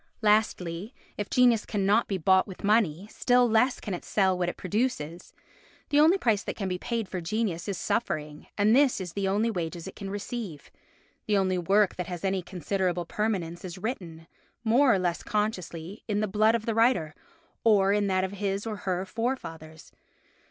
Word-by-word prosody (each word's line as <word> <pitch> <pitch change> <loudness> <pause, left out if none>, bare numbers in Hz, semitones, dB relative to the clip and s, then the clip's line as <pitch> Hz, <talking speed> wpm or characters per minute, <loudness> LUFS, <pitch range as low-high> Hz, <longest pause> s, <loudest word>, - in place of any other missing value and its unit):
Lastly, 210 -1 +1 0.2
if 205 - -4
genius 245 -4 +4
cannot 205 +2 +1
be 195 - -1
bought 190 +2 +3
with 190 - -10
money, 200 -4 +2
still 245 0 +3
less 235 +3 +2
can 205 - -5
it 175 - -5
sell 190 -3 +2
what 180 -1 0
it - - -7
produces. 185 - -2 0.6
The 290 - +3
only 325 +6 +6
price 225 - +1
that - - -5
can 195 - -3
be 180 -1 -2
paid 230 -1 -2
for 185 -1 -4
genius 185 -1 -2
is 200 -3 -2
suffering, 150 -6 -2
and 215 +2 +4
this 275 -4 +4
is 180 -3 -6
the 200 -1 -1
only 210 +4 +1
wages 170 -3 -4
it - - -9
can 195 -2 -6
receive. 205 -5 -6 0.6
The 210 -1 +3
only 185 -1 +1
work 195 +3 +2
that 180 -2 -3
has 180 0 -5
any 190 -1 0
considerable 180 -1 -2
permanence 180 -4 -2
is 180 -1 -7
written, 180 -7 -5 0.4
more 245 +4 +4
or 200 - +4
less 175 -2 -1
consciously, 195 -3 -3
in 210 -2 0
the 215 - 0
blood 215 +3 +3
of 225 -1 -3
the 230 - 0
writer, 225 -9 +2 0.5
or 200 -3 +4
in 205 -1 +1
that 185 -1 +1
of 190 - -2
his 200 0 -2
or 215 -2 -4
her 185 -2 -2
forefathers. 165 -9 -5
200 Hz, 185 wpm, -27 LUFS, 180-220 Hz, 0.6 s, only